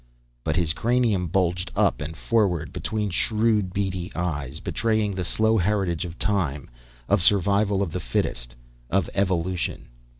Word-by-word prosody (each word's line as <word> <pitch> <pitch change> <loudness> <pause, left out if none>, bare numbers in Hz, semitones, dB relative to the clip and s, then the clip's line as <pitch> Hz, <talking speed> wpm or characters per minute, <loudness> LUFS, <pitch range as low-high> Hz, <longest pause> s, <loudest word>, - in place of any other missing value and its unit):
But 80 - -1
his 85 -2 +2
cranium 115 -6 +1
bulged 90 0 0
up - - +2
and 80 +1 -5
forward 100 -8 +1
between 105 -2 -2
shrewd, 105 0 +1
beady 95 -2 -2
eyes, 75 -5 -3
betraying 110 +1 0
the 95 -1 -2
slow 110 +4 +3
heritage 90 -3 0
of 85 -1 -8
time, 85 -10 -1 0.4
of 100 -2 +3
survival 100 +1 +3
of 90 - -4
the - - -3
fittest, - - -2 0.3
of 95 0 +1
evolution. 90 -2 -1
95 Hz, 140 wpm, -25 LUFS, 85-105 Hz, 0.4 s, slow